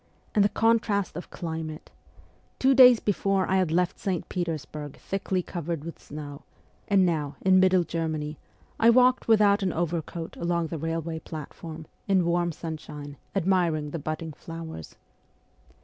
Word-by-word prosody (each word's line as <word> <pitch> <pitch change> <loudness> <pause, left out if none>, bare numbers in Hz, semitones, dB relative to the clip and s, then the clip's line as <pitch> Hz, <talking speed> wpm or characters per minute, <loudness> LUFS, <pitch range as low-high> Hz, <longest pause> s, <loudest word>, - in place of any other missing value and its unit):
And 205 - +4
the 205 - +3
contrast 215 -5 +1
of 175 - -7
climate! 160 -2 -6 0.7
Two 265 +1 +4
days 250 -3 +8
before 195 -2 +1
I 190 - +2
had 185 -3 +2
left 175 +1 +1
St. 185 -4 -2
Petersburg 155 -4 -4
thickly 190 -1 -2
covered 170 -3 -4
with 165 +1 -8
snow, 145 -1 -8 0.5
and 195 -2 +4
now, 150 -5 -1
in 185 0 +5
Middle 185 -1 +4
Germany, 155 -2 -3 0.4
I 230 - +6
walked 250 +1 +4
without 210 -2 +5
an 190 -2 +1
overcoat 165 0 -3
along 170 -1 -1
the 165 - -4
railway 165 +1 -3
platform, 160 +1 -8 0.2
in 190 -3 +3
warm 175 0 +1
sunshine, 150 -3 -7 0.2
admiring 170 -6 +1
the 165 - -4
budding 155 +2 -4
flowers. 165 - -8
170 Hz, 145 wpm, -27 LUFS, 160-190 Hz, 0.7 s, days